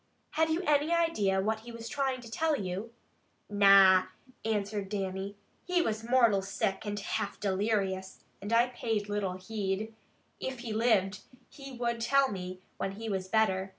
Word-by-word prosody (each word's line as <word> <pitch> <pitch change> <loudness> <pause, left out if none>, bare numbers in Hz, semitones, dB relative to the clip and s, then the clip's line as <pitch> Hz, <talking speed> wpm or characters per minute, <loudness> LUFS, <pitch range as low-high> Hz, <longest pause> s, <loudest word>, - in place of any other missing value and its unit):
"Have 320 0 +2
you 325 +4 0
any 300 0 +2
idea 220 - +2
what 220 +2 0
he 235 +2 -10
was 230 0 -8
trying 265 -1 -1
to 230 -2 -11
tell 315 +7 +1
you?" 195 0 -4 0.6
"Na!" 195 -2 +7 0.4
answered 205 -2 -2
Dannie. 195 0 -3 0.3
"He 360 0 +1
was 220 0 -2
mortal 235 -4 +4
sick, 195 +1 -2
and 205 0 -2
half 200 - -3
delirious, 195 -1 -1 0.2
and 205 +2 -5
I 235 +2 +4
paid 225 -4 -2
little 205 -3 -1
heed. 205 +2 -3 0.5
If 260 -2 -4
he 230 -3 -4
lived, 210 -4 +2 0.3
he 275 -2 -10
would 235 -1 -2
tell 275 +2 +3
me 185 -1 -6
when 195 - -2
he 220 +2 -6
was 190 -2 -2
better. 190 -2 +1
215 Hz, 160 wpm, -30 LUFS, 195-240 Hz, 0.6 s, Na